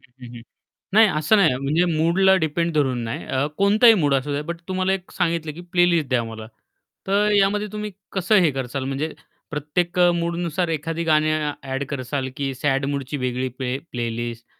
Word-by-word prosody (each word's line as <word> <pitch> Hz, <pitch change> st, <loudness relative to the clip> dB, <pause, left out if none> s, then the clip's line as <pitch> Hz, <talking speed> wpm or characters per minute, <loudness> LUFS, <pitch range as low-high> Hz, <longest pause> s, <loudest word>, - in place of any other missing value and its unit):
हं, 125 Hz, 0 st, -17 dB
हं, 120 Hz, -, -11 dB
हं. 115 Hz, -, -10 dB, 0.5 s
नाही 220 Hz, +1 st, +7 dB
असं 155 Hz, +3 st, +2 dB
नाही 195 Hz, -5 st, +5 dB
आहे 125 Hz, -, -1 dB
म्हणजे 155 Hz, +6 st, +2 dB
मूडला 180 Hz, +4 st, +4 dB
डिपेंड 165 Hz, +2 st, -1 dB
धरून 135 Hz, -5 st, +1 dB
नाही 115 Hz, -, -5 dB
अ, 130 Hz, +2 st, 0 dB
कोणताही 215 Hz, +4 st, +6 dB
मूड 145 Hz, -8 st, +2 dB
असू 135 Hz, +2 st, -1 dB
द्या, 145 Hz, +1 st, -1 dB
बट 170 Hz, +2 st, -6 dB
तुम्हाला 185 Hz, 0 st, 0 dB
एक 190 Hz, -1 st, -4 dB
सांगितलं 165 Hz, -3 st, -1 dB
की 170 Hz, -, -9 dB
प्लेलिस्ट 175 Hz, -4 st, +3 dB
द्या 125 Hz, -2 st, +1 dB
मला. 110 Hz, -1 st, -8 dB, 0.6 s
तर 205 Hz, +2 st, +2 dB
यामध्ये 205 Hz, +2 st, +2 dB
तुम्ही 210 Hz, 0 st, -4 dB, 0.2 s
कसं 195 Hz, +2 st, +1 dB
हे 160 Hz, -, +4 dB
कराल 130 Hz, 0 st, -4 dB
म्हणजे 140 Hz, +4 st, -3 dB, 0.4 s
प्रत्येक 165 Hz, +4 st, -2 dB
अ, 175 Hz, 0 st, +6 dB
मूडनुसार 170 Hz, 0 st, -1 dB
एखादी 165 Hz, +1 st, -2 dB
गाणी 155 Hz, -1 st, +3 dB, 0.3 s
ॲड 135 Hz, 0 st, -3 dB
कराल 130 Hz, -1 st, -3 dB
की 140 Hz, -1 st, -2 dB
सॅड 135 Hz, +1 st, 0 dB
मूडची 140 Hz, 0 st, -3 dB
वेगळी 125 Hz, -1 st, -2 dB
प्ले 130 Hz, 0 st, -2 dB
प्लेलिस्ट 120 Hz, -1 st, -4 dB
155 Hz, 185 wpm, -22 LUFS, 135-175 Hz, 0.6 s, नाही